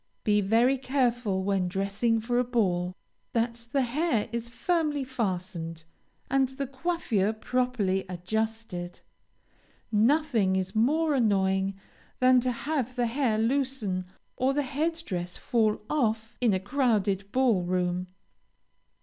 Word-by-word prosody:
Be 210 -2 +3
very 235 +7 +3
careful, 245 -7 0
when 195 -2 +1
dressing 200 +5 0
for 240 +2 0
a - - +3
ball, 185 -7 0 0.4
that 230 0 -1
the 275 0 +2
hair 260 -2 0
is 235 0 -4
firmly 300 +1 0
fastened, 185 -9 -3 0.4
and 270 -1 +2
the 270 +1 -4
coiffure 260 - 0
properly 220 -5 0
adjusted. 185 -1 -3 0.9
Nothing 230 -3 +3
is 190 0 -1
more 300 +8 +2
annoying 195 -5 +2 0.4
than 255 0 +6
to 250 +1 0
have 255 0 -2
the 245 -1 +1
hair 235 -2 +1
loosen 230 -6 0 0.3
or 265 +2 +1
the 290 - +1
head 320 +5 -2
dress 175 -2 -4
fall 220 -3 +1
off 225 -5 0
in 240 -3 +4
a 190 - +1
crowded 200 -4 0
ball 250 -7 +3
room. 180 0 -1
230 Hz, 125 wpm, -28 LUFS, 195-260 Hz, 0.9 s, than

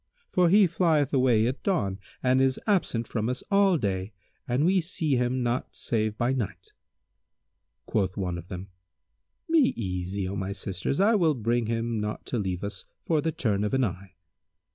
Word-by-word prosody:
For 180 -2 +3
he 200 +3 +6
flieth 160 -5 +1
away 125 -5 +4
at 130 +3 -2
dawn 100 - 0 0.2
and 130 +1 +3
is 135 -1 +2
absent 170 - +1
from 110 0 -2
us 125 - -3
all 195 -3 +4
day 95 -4 -2 0.3
and 125 +5 +1
we 185 +1 +4
see 160 -4 -1
him 125 +1 0
not 120 +1 -2
save 110 -2 -1
by 120 +2 +1
night." 95 -8 -4 1.1
Quoth 95 -4 -1
one 90 -3 -2
of 85 - -11
them, 95 +1 -7 0.8
"Be 310 -6 +4
easy, 95 -2 -3
O 95 - -4
my 95 0 -3
sisters; 95 +8 -3
I 205 +4 +5
will 165 -8 +3
bring 120 0 0
him 115 0 -1
not 105 0 -4
to 120 - -2
leave 95 -2 -3
us 100 -1 -6 0.2
for 160 -3 +2
the 160 - 0
turn 105 -9 0
of 105 +5 0
an 135 - +2
eye?" 95 -3 -4
120 Hz, 180 wpm, -27 LUFS, 100-150 Hz, 1.1 s, he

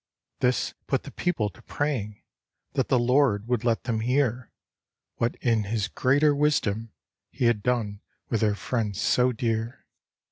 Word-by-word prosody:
This 125 -2 +1
put - - 0
the - - -9
people 115 -13 -1
to - - -18
praying 120 -9 -3 0.5
That 135 -2 0
the 130 - +3
Lord 120 -3 +2
would 120 -2 0
let 115 -2 +1
them 115 -3 -1
hear 125 0 0 0.7
What 115 +1 0
in 115 -4 +2
his 105 0 -1
greater 145 +6 +3
wisdom 115 -7 +1 0.4
He 125 - -2
had 115 -3 +3
done 110 -4 -1 0.3
with 115 - -1
their 105 -2 +2
friends 105 -3 -2
so 125 0 +3
dear. 115 0 -2
120 Hz, 150 wpm, -26 LUFS, 110-130 Hz, 0.7 s, the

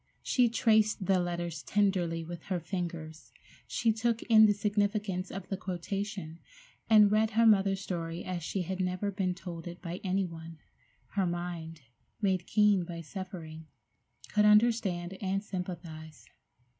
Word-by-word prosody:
She 245 -2 +3
traced 220 -4 +2
the 190 -1 +3
letters 175 -2 -3
tenderly 185 -5 +1
with 170 0 -7
her 185 -2 -1
fingers, 165 -3 -5 0.4
she 225 -1 +1
took 230 +1 0
in 220 -2 +7
the - - +4
significance 205 -2 -1
of 195 -1 -7
the 195 - -2
quotation, 190 -2 -4 0.5
and 210 -2 +7
read 215 +1 +3
her 230 +1 +3
mother's 195 -3 +4
story 170 -2 -4
as 180 -2 -3
she 180 +4 -2
had 185 +2 -4
never 185 +2 -1
been 185 -2 -1
told 175 -2 -8
it 175 0 -8
by 175 0 -6
any 190 0 +1
one. 165 -1 -9 0.5
Her 195 -2 0
mind, 170 -2 -5 0.4
made 190 -4 0
keen 210 -3 +4
by 170 -1 -6
suffering, 165 -3 -8 0.7
could 210 0 +4
understand 210 -5 +3
and 195 0 -1
sympathize. 170 -5 -7
185 Hz, 145 wpm, -30 LUFS, 175-205 Hz, 0.7 s, in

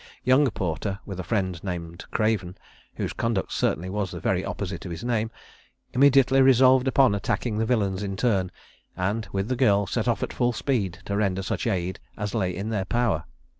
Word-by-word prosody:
Young 130 +2 +4
Porter, 95 0 -3
with 95 -3 -6
a - - -3
friend 95 -5 -2
named 85 -2 -5
Craven, 105 -5 0 0.4
(whose - - -3
conduct 115 -5 -1
certainly 90 +3 0
was 100 0 -2
the 90 - -6
very 95 0 0
opposite 95 -4 -4
of 90 - -6
his 85 +3 -6
name,) 115 -2 0 0.6
immediately 135 0 +5
resolved 130 0 +6
upon 130 -3 +4
attacking 105 +2 -1
the 110 - 0
villains 100 -5 +1
in 100 -1 -3
turn, 95 -6 +1 0.5
and, 100 +4 -1
with 100 +1 -1
the 130 - 0
girl, 105 -6 +3
set 110 +4 -2
off 120 - +1
at - - -4
full 120 -1 +1
speed 105 - -1
to 100 - -2
render 95 -2 0
such - - -2
aid 90 0 -1 0.2
as 105 -2 -3
lay 95 -5 0
in 100 +4 -4
their 100 -4 -1
power. 120 -1 0
100 Hz, 190 wpm, -25 LUFS, 95-120 Hz, 0.6 s, resolved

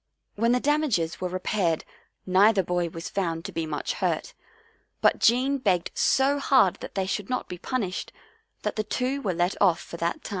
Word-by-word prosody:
When 230 +3 +1
the 250 - +3
damages 270 - 0
were 185 - 0
repaired 185 -2 -1 0.4
neither 195 +2 +4
boy 175 0 -1
was 165 +1 -7
found 165 -4 -2
to - - -5
be 165 -1 -3
much 150 - -3
hurt, - - -2 0.7
but - - +3
Jean 260 +4 +3
begged 190 -8 +1
so 275 +2 +2
hard 260 -10 +4
that - - -9
they 190 -1 0
should 195 +1 -3
not 250 - -2
be 180 - -7
punished, 205 -7 -3 0.5
that - - -2
the 215 - +1
two 255 +6 -2
were 190 -8 -1
let 175 +2 +1
off 185 -5 +4
for 170 - -9
that 170 0 -2
time. - - -7
195 Hz, 190 wpm, -26 LUFS, 175-250 Hz, 0.7 s, neither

